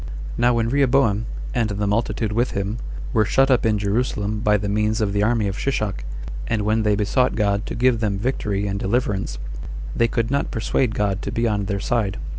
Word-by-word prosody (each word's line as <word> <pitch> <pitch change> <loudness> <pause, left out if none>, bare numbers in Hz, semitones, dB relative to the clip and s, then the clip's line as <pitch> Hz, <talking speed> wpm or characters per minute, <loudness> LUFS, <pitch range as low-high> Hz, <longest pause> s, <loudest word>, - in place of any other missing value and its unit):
3. - - -4
Now 120 0 +5
when 115 -1 +1
Rehoboam, 130 -5 +2 0.3
and 110 -2 +1
the 105 0 -1
multitude 105 +1 0
with 120 +4 0
him, 100 +4 -2 0.3
were 110 - +4
shut 135 +5 +3
up 125 -3 +3
in 105 -1 +2
Jerusalem 105 0 -1
by 105 0 +3
the 100 0 -3
means 105 +2 +1
of 105 -2 0
the 100 - +1
army 110 -1 +2
of 100 +1 -4
Shishak, 105 - -1 0.4
and 110 -3 0
when 110 +2 +2
they 105 -1 +2
besought 110 +5 +1
God 100 -1 0
to - - -4
give 125 0 +3
them 105 -3 0
victory 105 -3 -1
and 100 0 -2
deliverance, 100 - -1 0.6
they 115 - +3
could 115 +1 -1
not 140 0 0
persuade 110 0 0
God 100 -1 0
to - - -4
be 115 +1 +1
on 105 -2 0
their 100 0 -2
side. 105 -2 0
110 Hz, 210 wpm, -22 LUFS, 100-115 Hz, 0.6 s, Now